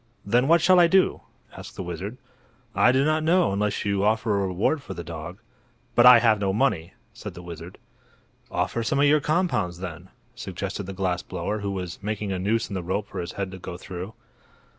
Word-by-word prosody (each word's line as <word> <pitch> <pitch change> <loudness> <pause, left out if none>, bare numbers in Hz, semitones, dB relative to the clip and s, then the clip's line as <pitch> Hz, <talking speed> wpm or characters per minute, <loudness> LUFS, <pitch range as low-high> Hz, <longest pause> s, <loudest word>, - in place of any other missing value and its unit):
"Then 120 +6 +2
what 165 +1 +5
shall 185 0 +6
I 175 - +7
do?" 190 +2 +3 0.3
asked - - -10
the - - -5
wizard. 90 +7 -6 0.6
"I 125 - +5
do 135 +2 +2
not 155 +1 +2
know, 170 - +3
unless 105 +1 -1
you 100 -1 0
offer 110 0 +1
a - - 0
reward 100 - 0
for - - -8
the 85 - -6
dog." 85 +2 -7 0.6
"But 120 +1 +6
I 125 -1 +10
have 110 -3 +3
no 100 -1 0
money," 100 -7 0 0.2
said - - -8
the 90 - -9
wizard. 85 -3 -9 0.7
"Offer 115 - -1
some 115 - 0
of 145 - +5
your 150 +1 +4
compounds, 145 - 0
then," 90 0 -8 0.2
suggested 95 +1 -5
the 95 - -5
glass 90 -2 -1
blower, 95 +4 -4
who 100 -1 -3
was 90 -3 -5
making 105 0 -3
a 95 - -2
noose 110 +4 0
in 100 - -8
the 95 - -2
rope 95 +4 -3
for - - -6
his 85 - -6
head 100 -2 -4
to 95 - -9
go 85 -1 -7
through. 95 +3 -8
100 Hz, 210 wpm, -25 LUFS, 90-120 Hz, 0.7 s, I